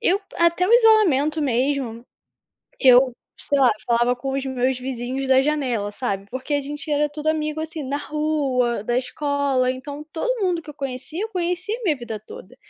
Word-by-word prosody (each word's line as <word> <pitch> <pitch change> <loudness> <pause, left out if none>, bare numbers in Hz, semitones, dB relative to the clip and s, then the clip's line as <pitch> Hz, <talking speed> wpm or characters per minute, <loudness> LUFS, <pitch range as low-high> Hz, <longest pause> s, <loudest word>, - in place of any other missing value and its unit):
eu 400 -3 +2 0.2
até 340 +1 +3
o 430 - +2
isolamento 375 - +5
mesmo, 250 -2 -1 0.8
que 265 - +2
eu 255 0 +7 0.2
sei 285 - -1
lá, 260 - +6 0.2
falava 240 +1 +3
com 270 +2 -4
os 275 0 -2
meus 260 0 0
vizinhos 255 +1 -4
da 265 0 +5
janela, 260 -8 -1
sabe. 200 -3 -3
Porque 260 +4 -4
a 285 - +2
gente 295 +2 -6
era 295 0 +2
tudo 300 +1 -8
amigo 310 0 0
assim, 315 0 -5
na 275 +1 -2
rua, 285 -7 0
da 240 +2 -1
escola, 275 -1 0
então 285 +3 -7
todo 480 +5 -1
mundo 350 -3 0
que 305 - -13
eu - - -8
conhecia 275 +6 -5
eu 445 - -4
conheci 360 +1 -2
minha 315 -7 +1
vida 230 -3 -6
toda. 215 +2 -12
280 Hz, 185 wpm, -22 LUFS, 255-310 Hz, 0.8 s, eu